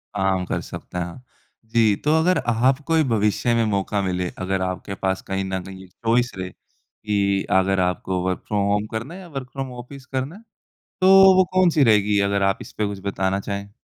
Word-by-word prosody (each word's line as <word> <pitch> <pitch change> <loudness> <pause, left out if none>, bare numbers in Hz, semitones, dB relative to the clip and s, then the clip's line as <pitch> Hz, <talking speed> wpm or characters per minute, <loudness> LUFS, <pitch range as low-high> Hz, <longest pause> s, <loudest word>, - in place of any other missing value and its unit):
आराम 95 -1 0
कर - - -2
सकते - - -8
हैं। 90 +8 -5 0.4
जी, 110 -2 +3
तो 150 +8 +1
अगर 180 +3 +3
आपको 130 +7 +2
ही 160 - +4
भविष्य 105 +3 +1
में 115 -1 +2
मौका 100 -1 -1
मिले, 90 -2 -2
अगर 95 0 -1
आपके 95 +1 -4
पास 95 0 -1
कहीं 95 0 -2
न 95 -1 -3
कहीं 95 0 -11
चॉइस 115 +5 0
रहे 95 0 -4
कि 100 -1 -3 0.2
अगर 95 0 +1
आपको 90 0 -1
वर्क 95 - -2
फ्रॉम 105 -2 0
होम 105 +1 +1
करना 115 +8 -5
है 185 - -9
या 180 - -11
वर्क 135 -5 -7
फ्रॉम 135 -2 -5
ऑफ़िस 130 +2 -11
करना 135 +5 -4
है, 210 - -13 0.6
तो 190 0 +8
वो 185 - +6
कौन-सी 175 -6 +4
रहेगी, 105 -3 +3
अगर 100 0 +1
आप 95 0 +2
इस - - -12
पे 105 - +1
कुछ 100 -1 -5
बताना 95 0 0
चाहें? 100 0 -5
105 Hz, 200 wpm, -22 LUFS, 95-130 Hz, 0.6 s, तो